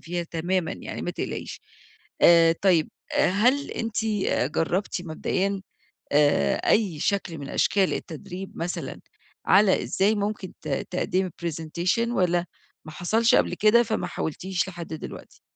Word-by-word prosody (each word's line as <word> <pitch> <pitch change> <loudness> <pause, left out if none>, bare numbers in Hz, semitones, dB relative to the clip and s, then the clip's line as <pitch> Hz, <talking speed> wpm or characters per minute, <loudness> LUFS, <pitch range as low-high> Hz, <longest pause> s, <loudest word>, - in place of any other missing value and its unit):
فيها 175 +1 -3
تمامًا 170 +1 -1
يعني - - -7
ما - - -2
تقلقيش. - - -5 0.6
آآ، 165 -1 +7
طيب، 175 -5 +4 0.2
هل 245 +10 +2
أنتِ 225 -1 -2 0.5
جربتِ 180 +2 -1
مبدئيًا 190 +4 -2 0.5
آآ، 145 - +3
أي 190 -9 +2
شكل 190 -4 -1
من 140 -1 -7
أشكال 195 -2 +2
التدريب 180 +4 -7
مثلًا 170 -4 -4 0.5
على 190 0 +5
إزاي 200 +3 +1
ممكن 205 -2 -3
ت 155 - -7
تقدّمي 180 +5 -1
presentation 170 +7 -1
والّا 180 -6 +1 0.4
ما 155 - -8
حصلش 220 +8 +2
قبل - - +3
كده 215 +3 +5
فما 220 -2 -2
حاولتيش 185 +4 -3
لحد 175 -2 -7
دلوقتي؟ 160 - -9
180 Hz, 125 wpm, -25 LUFS, 165-200 Hz, 0.6 s, آآ